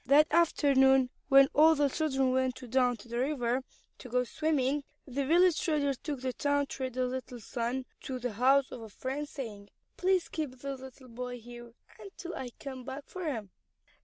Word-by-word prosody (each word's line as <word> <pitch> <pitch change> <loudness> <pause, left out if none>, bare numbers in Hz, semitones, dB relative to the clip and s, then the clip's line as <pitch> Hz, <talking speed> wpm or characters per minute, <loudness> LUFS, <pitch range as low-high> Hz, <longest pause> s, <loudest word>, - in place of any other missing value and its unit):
That 290 +3 +7
afternoon 270 -5 +4 0.2
when 275 0 +7
all 320 +2 +6
the 290 -1 +3
children 270 -3 +1
went 260 -1 +1 0.2
down 250 -2 +3
to 220 - -14
the 235 +1 -3
river 255 -2 0 0.4
to 250 - -10
go 250 +1 +2
swimming, 290 0 0 0.2
the 275 +1 -2
village 345 +1 +4
trader 290 -4 +1
took 280 0 -5
the 260 -1 -2
town 285 +1 +1
trader's 255 -2 -3
little 255 -1 -6
son 240 +3 -3 0.2
to 260 - -3
the 245 -2 -3
house 265 +5 +3
of 245 - -7
a 220 - -9
friend 270 +7 -4
saying, 210 -7 -7 0.3
"Please 370 -1 +2
keep 305 -5 -4
this 275 0 -5
little 260 0 -12
boy 245 +1 -6
here 240 0 -11 0.3
until 375 -3 -8
I 255 - -5
come 260 -2 -7
back 265 +3 -6
for 370 -1 -7
him." 225 - -3
265 Hz, 180 wpm, -31 LUFS, 250-290 Hz, 0.4 s, That